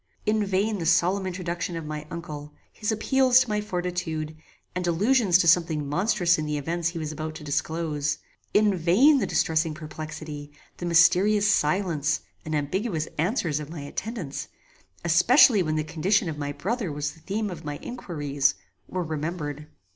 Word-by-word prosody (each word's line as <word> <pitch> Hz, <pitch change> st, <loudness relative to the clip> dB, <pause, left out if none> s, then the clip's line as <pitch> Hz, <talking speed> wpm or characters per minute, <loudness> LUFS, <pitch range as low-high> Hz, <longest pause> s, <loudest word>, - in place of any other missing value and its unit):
In 215 Hz, 0 st, +2 dB
vain 200 Hz, +2 st, 0 dB
the 165 Hz, -, -2 dB
solemn 185 Hz, +3 st, +3 dB
introduction 175 Hz, -1 st, -3 dB
of 165 Hz, -2 st, -5 dB
my 150 Hz, 0 st, -6 dB
uncle, 150 Hz, -3 st, -7 dB, 0.2 s
his 215 Hz, 0 st, -2 dB
appeals 255 Hz, +3 st, +4 dB
to 250 Hz, -, -2 dB
my 210 Hz, 0 st, 0 dB
fortitude, 175 Hz, -5 st, -3 dB, 0.4 s
and 180 Hz, -1 st, -2 dB
allusions 200 Hz, +2 st, +4 dB
to 180 Hz, -, +1 dB
something 160 Hz, -3 st, +3 dB
monstrous 175 Hz, +1 st, +2 dB
in 155 Hz, -, -2 dB
the 150 Hz, 0 st, -1 dB
events 165 Hz, +4 st, -1 dB
he 170 Hz, 0 st, -3 dB
was 155 Hz, -2 st, -3 dB
about 155 Hz, +1 st, -5 dB
to 155 Hz, -, -9 dB
disclose; 150 Hz, 0 st, -1 dB, 0.3 s
in 210 Hz, -2 st, +4 dB
vain 205 Hz, -, +5 dB
the -, -, 0 dB
distressful 160 Hz, -1 st, +1 dB
perplexity, 155 Hz, -1 st, -7 dB, 0.3 s
the 175 Hz, -, -4 dB
mysterious 185 Hz, +5 st, +5 dB
silence 160 Hz, -5 st, +1 dB, 0.2 s
and 155 Hz, 0 st, -3 dB
ambiguous 160 Hz, +3 st, -1 dB
answers 165 Hz, -, 0 dB
of 150 Hz, -1 st, -7 dB
my 160 Hz, -2 st, -7 dB
attendants, 160 Hz, -, -5 dB, 0.6 s
especially 210 Hz, -, +6 dB
when 155 Hz, -3 st, -1 dB
the 155 Hz, -, 0 dB
condition 175 Hz, +6 st, +1 dB
of 160 Hz, -, -3 dB
my 145 Hz, -1 st, -2 dB
brother 195 Hz, -, -2 dB
was 145 Hz, 0 st, -2 dB
the 160 Hz, -, -17 dB
theme 205 Hz, +5 st, -3 dB
of 165 Hz, -3 st, -8 dB
my 145 Hz, -1 st, -4 dB
inquiries, 145 Hz, -, -1 dB, 0.3 s
were 185 Hz, -1 st, -2 dB
remembered. 150 Hz, -2 st, -4 dB
170 Hz, 165 wpm, -26 LUFS, 155-195 Hz, 0.6 s, especially